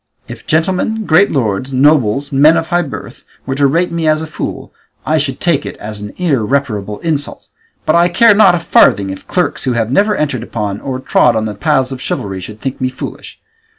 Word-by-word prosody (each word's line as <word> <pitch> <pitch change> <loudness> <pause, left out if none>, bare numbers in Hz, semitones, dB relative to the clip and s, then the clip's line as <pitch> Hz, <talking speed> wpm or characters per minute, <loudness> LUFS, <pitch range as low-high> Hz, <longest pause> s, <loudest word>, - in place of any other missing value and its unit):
If - - -10
gentlemen, 190 +7 0
great 180 +5 +4
lords, 125 -1 -1
nobles, 140 -1 +2
men 150 +4 +5
of 165 0 -2
high 175 0 +2
birth, 150 -6 -8 0.2
were 135 - -2
to 140 +1 +2
rate 170 +6 0
me 165 -1 -1
as 155 0 +2
a - - -4
fool 155 - -6 0.3
I 155 +1 +1
should 135 -2 -3
take 160 -5 +1
it - - -7
as 105 -1 -7
an 105 0 -7
irreparable 125 - -1
insult; 155 -4 -2 0.4
but 155 - +2
I 170 +1 +4
care 210 +5 +5
not 195 -4 +5
a - - -1
farthing 100 - +3
if 95 - -10
clerks 180 -6 -1
who 130 - +1
have 115 0 -1
never 205 +7 +2
entered 150 -3 -1
upon 105 -3 -4
or 130 -2 -4
trod 125 -2 +2
the 105 - -4
paths 130 +5 0
of 130 -1 -6
chivalry 95 -5 -4
should 105 +4 -9
think 135 +1 -5
me 130 - +1
foolish. 130 - -9
140 Hz, 205 wpm, -14 LUFS, 115-165 Hz, 0.4 s, men